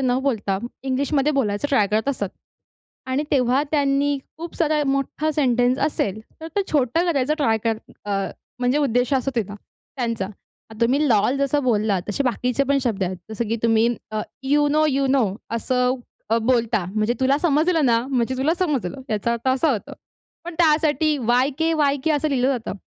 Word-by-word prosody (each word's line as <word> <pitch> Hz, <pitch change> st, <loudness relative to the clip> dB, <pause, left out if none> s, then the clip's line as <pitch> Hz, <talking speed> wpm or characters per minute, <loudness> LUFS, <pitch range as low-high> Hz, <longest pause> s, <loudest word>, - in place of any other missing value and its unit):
न 255 Hz, -1 st, +1 dB
बोलता 205 Hz, -8 st, 0 dB, 0.2 s
इंग्लिशमध्ये 275 Hz, +2 st, 0 dB
बोलायचं 230 Hz, -1 st, 0 dB
ट्राय 215 Hz, -8 st, +3 dB
करत 215 Hz, +6 st, 0 dB
असतात. 205 Hz, -8 st, -1 dB, 0.8 s
आणि 260 Hz, +3 st, 0 dB
तेव्हा 260 Hz, 0 st, +3 dB
त्यांनी 285 Hz, -1 st, +1 dB, 0.2 s
खूप 335 Hz, +1 st, -7 dB
सारा 310 Hz, -2 st, +1 dB
मोठा 275 Hz, +3 st, 0 dB
सेंटन्स 250 Hz, -3 st, +2 dB
असेल, 210 Hz, -8 st, -2 dB, 0.2 s
तर 320 Hz, -, -6 dB
ते 400 Hz, -, +3 dB
छोटं 295 Hz, +4 st, +2 dB
करायचं 280 Hz, +2 st, +1 dB
ट्राय 225 Hz, -7 st, +2 dB
कर 225 Hz, -1 st, +1 dB, 0.3 s
अ, 205 Hz, -, -5 dB, 0.5 s
म्हणजे 250 Hz, +3 st, +1 dB
उद्देश 245 Hz, -2 st, +1 dB
असा 265 Hz, +1 st, 0 dB
होते 230 Hz, -, +2 dB
ना 205 Hz, -, -7 dB
त्यांचा. 230 Hz, -1 st, -5 dB, 0.5 s
तुम्ही 275 Hz, +6 st, +3 dB
लोल 230 Hz, +4 st, +3 dB
जसं 280 Hz, +1 st, +1 dB
बोललात 210 Hz, -6 st, +1 dB
तसे 205 Hz, -, 0 dB
बाकीचे 250 Hz, +2 st, 0 dB
पण 280 Hz, +1 st, +2 dB
शब्द 215 Hz, -6 st, -1 dB
आहेत. 185 Hz, +1 st, -3 dB
जसं 220 Hz, 0 st, -3 dB
की 230 Hz, -, 0 dB
तुम्ही 225 Hz, 0 st, +3 dB, 0.2 s
अ, 215 Hz, 0 st, -2 dB, 0.2 s
"यू 290 Hz, +2 st, +2 dB
नो, 305 Hz, +1 st, +3 dB
यू 275 Hz, -1 st, +1 dB
नो" 265 Hz, -3 st, +3 dB, 0.3 s
असं 250 Hz, +1 st, +1 dB, 0.5 s
बोलता. 230 Hz, -6 st, +2 dB
म्हणजे 215 Hz, +3 st, +1 dB
तुला 270 Hz, +2 st, +3 dB
समजलं 320 Hz, 0 st, +2 dB
ना 230 Hz, -1 st, +3 dB
म्हणजे 260 Hz, -1 st, 0 dB
तुला 305 Hz, +6 st, +2 dB
समजलं. 275 Hz, -, -1 dB
याचा 215 Hz, +2 st, 0 dB
अर्थ 235 Hz, +2 st, -2 dB
असा 265 Hz, +4 st, +2 dB
होतो. 215 Hz, -, -5 dB, 0.5 s
पण 345 Hz, 0 st, -6 dB
त्यासाठी 310 Hz, -1 st, +3 dB
वाय-के, 265 Hz, +7 st, +1 dB
वाय-के 285 Hz, 0 st, +1 dB
असं 300 Hz, +1 st, +1 dB
लिहिलं 260 Hz, -2 st, +1 dB
जातं. 245 Hz, -4 st, -3 dB
260 Hz, 170 wpm, -22 LUFS, 230-290 Hz, 0.8 s, ट्राय